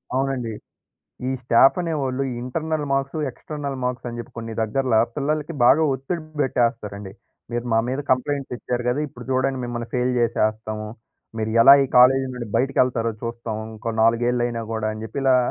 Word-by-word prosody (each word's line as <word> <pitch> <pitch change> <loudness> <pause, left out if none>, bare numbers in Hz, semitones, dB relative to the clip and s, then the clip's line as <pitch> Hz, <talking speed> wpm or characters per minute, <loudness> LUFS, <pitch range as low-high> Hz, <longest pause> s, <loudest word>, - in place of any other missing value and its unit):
అవునండి. 130 -4 -1 0.8
ఈ - - 0
స్టాఫనేవాళ్లు, 135 +2 +2
ఈ - - -4
ఇంటర్నల్ 155 +3 -2
మార్క్స్, 135 +2 -1
ఎక్స్‌టర్నల్ 140 +1 -6
మార్క్సని 120 -1 -3
జెప్పి 120 - -8
కొన్ని 115 -1 -6
దగ్గర్ల 125 +2 0 0.2
పిల్లలకి 150 +2 -1
బాగా 145 +6 +6
ఒత్తిడి 135 +6 -4 0.2
బెట్టేస్తారండి. 115 -7 -1 0.4
"మీరు 120 +1 -2
మా 115 - +4
మీద 130 +3 -1
కంప్లైంట్స్ 135 +1 0
ఇచ్చారు 120 0 -3
గదా! 125 +4 +1
ఇప్పుడు 125 -2 -12
జూడండి, 130 0 +1
మిమ్మల్ని 120 -1 -4
ఫెయిల్ 125 0 +1
జేసేస్తాము. 110 -2 -1 0.5
మీరు 110 0 -1
ఎలా 135 - +10
ఈ - - -2
కాలేజీ 130 +2 +6
నుండి 120 -2 -6
బయటికి 135 +3 +1
ఎళ్తారో 115 -2 -1
చూస్తాం. 115 -1 -4 0.2
ఇంకో 115 +1 -4
నాలుగేళ్లైనా 120 +1 +1
గూడా" 110 -1 -1
అని 110 - -8
జెప్పి 115 +5 -5
ఇలా 130 -1 +5
125 Hz, 155 wpm, -23 LUFS, 115-135 Hz, 0.8 s, ఎలా